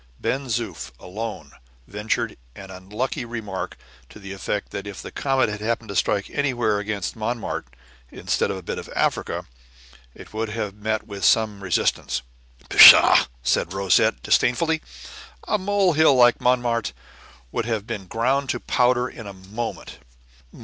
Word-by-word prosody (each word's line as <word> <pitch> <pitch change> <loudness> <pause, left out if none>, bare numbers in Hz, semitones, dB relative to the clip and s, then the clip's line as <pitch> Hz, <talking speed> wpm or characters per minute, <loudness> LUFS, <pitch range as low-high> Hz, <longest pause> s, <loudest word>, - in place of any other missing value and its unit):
Ben 135 +1 -2
Zoof 120 -1 -3
alone 110 +4 -7 0.3
ventured 105 - -2 0.2
an 95 -1 -10
unlucky 105 +8 -4
remark 115 -5 -6 0.3
to - - -13
the 100 -1 -8
effect 100 +1 -4
that 100 +1 -6
if 100 - -8
the - - -8
comet 135 -2 +1
had 105 -1 -5
happened 115 0 -2
to 100 - -5
strike 100 +1 +1
against 110 -7 -1
Montmartre, 110 - -4 0.4
instead - - -1
of - - -3
a 95 - -9
bit - - -4
of - - -10
Africa, - - -1 0.7
it - - -13
would 110 0 -3
have 105 -2 -4
met 110 +1 -3
with 100 -3 -8
some 110 -3 +3
resistance. 90 -8 0 0.4
"Pshaw!" - - +9 0.2
said 85 +8 0
Rosette, 95 -10 +2
disdainfully. 160 +5 +2 0.7
"A 210 - +1
mole 195 -2 +2
hill 155 -2 +5
like 120 -1 +5
Montmartre 120 - +1 0.6
would 115 - -2
have 110 -3 -2
been 100 -4 -6
ground 130 +6 0
to 120 - -1
powder 125 +1 +1
in 110 -5 -10
a 100 - -8
moment." 100 +5 -7
110 Hz, 150 wpm, -23 LUFS, 100-125 Hz, 0.7 s, Pshaw